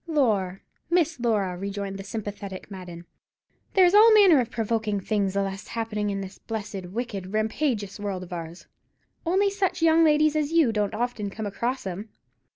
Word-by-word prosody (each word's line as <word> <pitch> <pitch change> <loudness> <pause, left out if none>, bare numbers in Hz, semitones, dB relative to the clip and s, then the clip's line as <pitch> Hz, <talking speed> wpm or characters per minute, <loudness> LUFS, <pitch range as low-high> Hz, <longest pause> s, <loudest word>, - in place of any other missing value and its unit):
"Lor', 210 - +1 0.3
Miss 330 -4 +2
Laura," 210 -6 0
rejoined 195 +1 -4
the - - -6
sympathetic 205 -2 -6
Madden, 175 -3 -9 0.7
"there's 365 -2 +6
all 435 +2 +8
manner 390 -9 +7
of 245 -2 -1
provoking 220 -2 -1
things 200 -1 -1
allus 195 0 -2
happenin' 220 -2 -2
in 195 -1 -2
this 195 0 -9
blessed, 210 -4 -5
wicked, 200 -2 -5
rampagious 215 -2 -1
world 195 -3 -3
of 180 - -9
ours; 170 0 -7 0.6
only 395 +3 +3
such 380 -3 -1
young 330 0 +5
ladies 305 -1 +4
as 305 -1 0
you 325 -8 +4
don't 210 -1 -1
often 230 -3 -2
come 215 +2 -6
across 235 +6 -3
'em. 195 +4 -5
215 Hz, 160 wpm, -26 LUFS, 195-290 Hz, 0.7 s, all